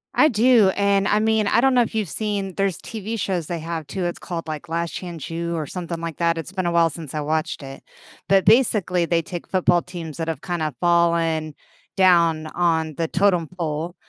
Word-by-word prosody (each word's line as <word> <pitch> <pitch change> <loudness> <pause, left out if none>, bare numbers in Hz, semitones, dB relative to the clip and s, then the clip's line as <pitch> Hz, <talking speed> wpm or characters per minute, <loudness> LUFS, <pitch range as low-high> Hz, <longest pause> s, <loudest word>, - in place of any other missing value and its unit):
I 310 - +6
do, 235 -4 +4
and 200 -1 +2
I 210 - +3
mean, 220 0 +2
I 230 - +3
don't 265 0 +3
know 245 - +5
if 230 - -6
you've 215 -5 -1
seen, 200 -1 -3
there's 195 -3 0
TV 220 0 -5
shows 180 -4 -1
they 170 +1 -4
have 165 -1 -5
too, 185 +4 -4
it's 175 - -3
called, 170 -2 -6
like, 155 +2 -6
Last 170 0 -2
Chance 170 -5 -6
U, 170 +1 -3
or 155 -2 -3
something 170 -2 -5
like 165 -3 -5
that, 170 -1 +1
it's 165 +2 -6
been 190 -2 -3
a 175 - +1
while 170 -1 +4
since 155 -2 -8
I 150 - -2
watched 155 +2 -2
it. 135 -1 -10 0.4
But, 195 -1 +4
basically, 205 -6 +3
they 165 0 +1
take 175 +1 -7
football 180 -2 +2
teams 170 -4 -8
that 165 -1 -3
have 165 - -3
kinda 160 -5 -2
fallen 170 -3 +2 0.4
down 170 -4 +4
on 160 -2 0
the 165 +2 -1
totem 180 -2 +2
pole, 165 +2 -3
170 Hz, 215 wpm, -22 LUFS, 165-195 Hz, 0.4 s, I